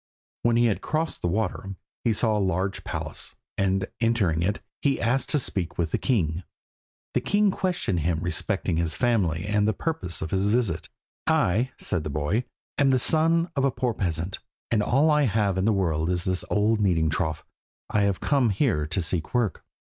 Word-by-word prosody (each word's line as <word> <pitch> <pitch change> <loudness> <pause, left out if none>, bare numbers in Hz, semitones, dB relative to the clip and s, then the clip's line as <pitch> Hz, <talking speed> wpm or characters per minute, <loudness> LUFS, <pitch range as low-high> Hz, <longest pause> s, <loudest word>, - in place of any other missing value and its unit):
When 120 0 +2
he 120 - +4
had 110 -4 +1
crossed 160 +1 -2
the - - 0
water, 95 0 -2 0.3
he 115 - +2
saw 110 0 +2
a - - +1
large 95 0 -1
palace, - - -5 0.2
and 95 -1 +1
entering 110 -9 +2
it, 100 +5 0 0.2
he 140 -2 +1
asked 125 +3 +1
to - - +3
speak 95 - -2
with 80 -3 -1
the - - 0
king. 90 - 0 0.7
The - - +1
king 205 0 +2
questioned 180 - -1
him 80 +1 0
respecting 90 +1 -1
his 85 -2 +1
family 95 -9 +1
and 105 0 +1
the 110 - +2
purpose 160 - -3
of 80 - -5
his 95 +1 +1
visit. 115 0 0 0.4
"I," 130 - +2
said 85 -4 0
the 75 - -4
boy, 75 - -1 0.3
"am 140 -1 +4
the 130 - +4
son 165 +5 +3
of 135 - +1
a 140 - +4
poor 125 -2 -1
peasant, 90 -1 -2 0.3
and 110 -3 +3
all 140 +9 +3
I 150 -1 +4
have 105 -4 +1
in 95 +1 0
the 110 - +4
world 85 -5 0
is 90 -1 0
an 95 -1 -1
old 105 +1 +2
kneading 80 -6 +2
trough. 80 -1 -2 0.5
I 105 - +2
have 100 -2 +1
come 135 -5 +2
here 95 - +1
to 90 +3 -1
seek 80 +5 -2
work." 115 -7 0
100 Hz, 195 wpm, -26 LUFS, 90-120 Hz, 0.7 s, he